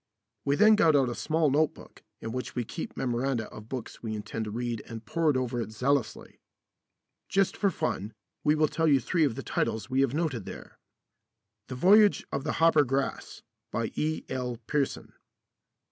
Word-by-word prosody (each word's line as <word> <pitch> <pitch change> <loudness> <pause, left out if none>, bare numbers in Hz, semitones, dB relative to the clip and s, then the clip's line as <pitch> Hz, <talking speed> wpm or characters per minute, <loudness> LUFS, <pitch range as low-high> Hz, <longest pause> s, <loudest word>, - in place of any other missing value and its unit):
We 140 - +2
then 215 +6 +6
got 165 -7 +4
out 135 -3 +3
a - - -3
small 155 +2 +1
note 155 +2 +2
book - - -15 0.2
in 115 - -5
which 125 +2 -5
we 120 - 0
keep - - -7
memoranda 125 -2 -1
of 110 +1 -11
books 125 -4 -6
we 110 -2 -4
intend 105 +1 -4
to - - -5
read 120 +1 -3
and 115 -1 -8
pored 155 +1 +1
over 125 -1 -1
it 110 -1 -5
zealously. 125 +1 -1 0.9
Just 195 -1 +2
for 200 - +2
fun, 155 - -2 0.3
we 150 - +4
will 155 0 +3
tell 160 +2 0
you 140 -3 +5
three 160 +5 +1
of 130 -6 -1
the - - -6
titles 110 +2 -2
we 130 +1 +3
have 135 0 +1
noted 145 - -1
there: - - -10 0.9
"The 130 - -6
Voyage 205 +9 +5
of 140 - -2
the 155 - -1
Hoppergrass," 145 -5 +1 0.3
by - - -2
E.L. 130 -5 -2
Pearson. 145 0 -2
135 Hz, 175 wpm, -28 LUFS, 120-155 Hz, 0.9 s, then